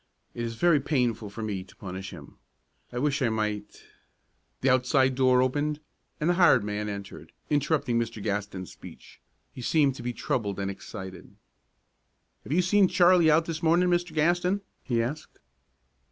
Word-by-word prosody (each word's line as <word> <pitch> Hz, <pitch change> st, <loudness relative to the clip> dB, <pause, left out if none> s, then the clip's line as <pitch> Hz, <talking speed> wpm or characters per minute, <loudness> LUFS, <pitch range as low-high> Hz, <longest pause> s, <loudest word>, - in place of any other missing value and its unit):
It 120 Hz, -, -4 dB
is 115 Hz, -1 st, -4 dB
very 165 Hz, +4 st, +4 dB
painful 125 Hz, -7 st, -1 dB
for 110 Hz, +2 st, -7 dB
me 100 Hz, -3 st, -3 dB
to -, -, -19 dB
punish 95 Hz, 0 st, -7 dB
him. 75 Hz, -6 st, -12 dB, 0.5 s
I 120 Hz, -, -6 dB
wish 140 Hz, +2 st, 0 dB
I 125 Hz, -, +2 dB
might 105 Hz, -2 st, -3 dB, 0.4 s
" -, -, -45 dB
The 135 Hz, -, +3 dB
outside 130 Hz, +1 st, +3 dB
door 130 Hz, -1 st, +4 dB
opened, 145 Hz, +3 st, -1 dB, 0.4 s
and 150 Hz, -, 0 dB
the 175 Hz, -, +4 dB
hired 170 Hz, -, +5 dB
man 105 Hz, 0 st, -3 dB
entered, 100 Hz, -1 st, -8 dB, 0.2 s
interrupting 145 Hz, -5 st, +1 dB
Mr. 115 Hz, -1 st, -3 dB
Gaston's 100 Hz, -2 st, -4 dB
speech. -, -, -14 dB, 0.3 s
He 125 Hz, -, -9 dB
seemed 140 Hz, +1 st, +2 dB
to 130 Hz, -, -9 dB
be 125 Hz, +1 st, -2 dB
troubled 105 Hz, -4 st, -2 dB
and 100 Hz, 0 st, -2 dB
excited. 95 Hz, -1 st, -9 dB, 1.1 s
"Have -, -, -9 dB
you 180 Hz, +4 st, +3 dB, 0.2 s
had 190 Hz, -, +5 dB
Charlie 175 Hz, -2 st, +5 dB
out 160 Hz, +2 st, +4 dB
this 165 Hz, -1 st, -4 dB
morning, 170 Hz, +2 st, +3 dB
Mr. 175 Hz, -2 st, 0 dB
Gaston?" 175 Hz, +5 st, +2 dB, 0.2 s
he 120 Hz, -3 st, 0 dB
asked. 145 Hz, +6 st, -6 dB
130 Hz, 170 wpm, -27 LUFS, 105-155 Hz, 1.1 s, hired